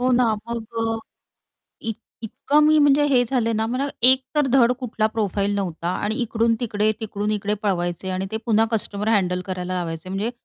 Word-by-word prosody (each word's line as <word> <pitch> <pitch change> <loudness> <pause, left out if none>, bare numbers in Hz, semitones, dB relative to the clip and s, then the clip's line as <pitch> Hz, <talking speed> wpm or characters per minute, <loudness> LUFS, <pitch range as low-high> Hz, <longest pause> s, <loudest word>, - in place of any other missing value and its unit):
हो 255 +1 +2
ना. 250 0 +4 0.2
मग 225 -1 -3 0.8
इ 225 - -2 0.3
इतकं 285 +7 +1
मी 310 0 +5
म्हणजे 290 0 +5
हे 255 -3 +4
झाले 230 -2 0
ना, 220 +1 0
मला 255 +4 -1 0.2
एक 260 +1 +7
तर 295 -2 +3
धड 250 -2 +5
कुठला 220 -4 -1
प्रोफाईल 205 -2 -1
नव्हता 175 -4 -3 0.2
आणि 215 +1 -1
इकडून-तिकडे, 225 -2 +1
तिकडून-इकडे 210 -1 -2
पळवायचे. 175 -1 -1
आणि 185 +1 -2
ते 220 - -1
पुन्हा 225 -1 +3
कस्टमर 210 -1 -1
हँडल 180 -4 +1
करायला 185 -1 -4
लावायचे. 170 -1 -4
म्हणजे 200 +5 -2
220 Hz, 165 wpm, -22 LUFS, 195-240 Hz, 0.8 s, एक